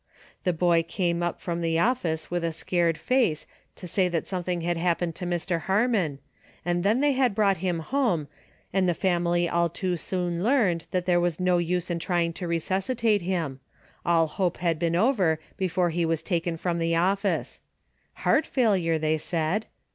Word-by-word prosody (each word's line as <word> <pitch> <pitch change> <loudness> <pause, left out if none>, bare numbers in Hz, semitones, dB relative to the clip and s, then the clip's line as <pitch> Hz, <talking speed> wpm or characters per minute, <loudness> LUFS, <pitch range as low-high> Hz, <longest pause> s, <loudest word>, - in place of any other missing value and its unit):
The 180 - +3
boy 170 0 +3
came 170 +1 -1
up 175 0 -2
from 170 -1 -3
the 165 -1 +1
office 170 -7 0
with 175 -1 -1
a 165 - 0
scared 170 0 0
face 245 - +1 0.3
to - - -10
say 185 +2 +1
that 170 -2 -2
some 185 -2 -3
thing 175 -1 -2
had 175 +1 0
happened 170 0 0
to 180 - -4
Mr. 175 -1 -1
Harmon, 195 - +1 0.5
and 175 0 0
then 215 +6 +2
they 290 0 +4
had 255 -5 +1
brought 200 -3 +3
him 175 -1 -1
home 185 - 0 0.5
and 185 -1 +2
the 175 - +1
family 175 -2 +1
all 170 0 +1
too 180 +1 -2
soon 175 0 -2
learned 210 -9 +2
that 180 -1 -1
there 175 -1 +3
was 175 -1 0
no 180 -1 +2
use 180 +1 -1
in 170 - -1
trying 170 -1 0
to 175 +1 -5
resuscitate 200 +6 0
him, 170 -7 -2 0.2
— - - -29
all 165 -1 +3
hope 175 +3 -1
had 165 -2 0
been 170 -1 0
over 185 - +2 0.2
before 180 -2 0
he 170 +1 0
was 165 -1 0
taken 170 -2 -1
from 170 0 -1
the 165 0 +1
office. 195 +3 0 0.6
Heart - - +3
failure, 190 -10 +2
they 155 0 0
said! 170 +7 -1
175 Hz, 185 wpm, -26 LUFS, 165-190 Hz, 0.6 s, they